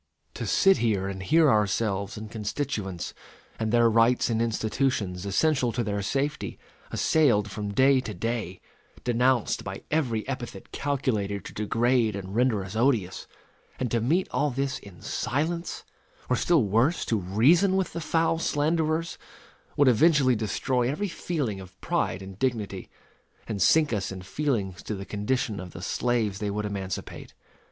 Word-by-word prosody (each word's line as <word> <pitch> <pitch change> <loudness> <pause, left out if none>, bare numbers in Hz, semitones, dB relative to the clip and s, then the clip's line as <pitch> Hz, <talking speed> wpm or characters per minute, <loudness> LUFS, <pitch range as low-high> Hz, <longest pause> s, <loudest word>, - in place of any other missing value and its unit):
To - - -5
sit 195 -1 +5
here 105 -5 +1
and 95 -1 -5
hear 155 +10 +4
ourselves 100 -1 0
and 110 0 -8
constituents, 105 -4 -3 0.5
and 110 -1 -1
their 120 0 +5
rights 115 +2 +3
and 115 0 +1
institutions 110 -4 -1
(essential 130 +4 +2
to 120 - -1
their 100 -1 -2
safety), 140 +8 -2 0.3
assailed 115 -10 +2
from 105 0 -4
day 130 +5 +4
to 110 -5 -5
day 110 -2 -3 0.4
denounced 125 0 +1
by 95 0 -6
every 125 -9 0
epithet 120 -7 -6
calculated 115 -8 -1
to - - -8
degrade 115 +1 +1
and 95 -1 -6
render 115 -4 +1
us 95 - -8
odious; 115 -6 +1 0.5
and 125 -2 -2
to 115 - +1
meet 165 +11 +1
all 145 +1 +1
this 135 0 -2
in 95 -4 -14
silence, 165 +6 -2 0.5
or - - +5
still 160 +2 +3
worse, 115 - +2
to 110 - 0
reason 135 - +3
with 190 -1 0
the 170 - -4
foul 165 +1 +1
slanderers, 160 +1 0 0.6
would 145 - +5
eventually 130 +1 +5
destroy 120 +3 0
every 195 +9 -2
feeling 145 - -3
of 95 0 -13
pride 95 - -1
and 95 0 -10
dignity, 110 -7 -2 0.6
and 105 -4 -3
sink 155 - +4
us 100 -2 -2
in 95 -1 -7
feelings 100 -4 -2
to 110 - -4
the 95 0 -7
condition 105 +1 -1
of 90 -1 -8
the 85 - -8
slaves 110 -2 0
they 105 - -2
would 105 +1 -2
emancipate. 100 -2 -5
115 Hz, 155 wpm, -27 LUFS, 100-140 Hz, 0.6 s, sit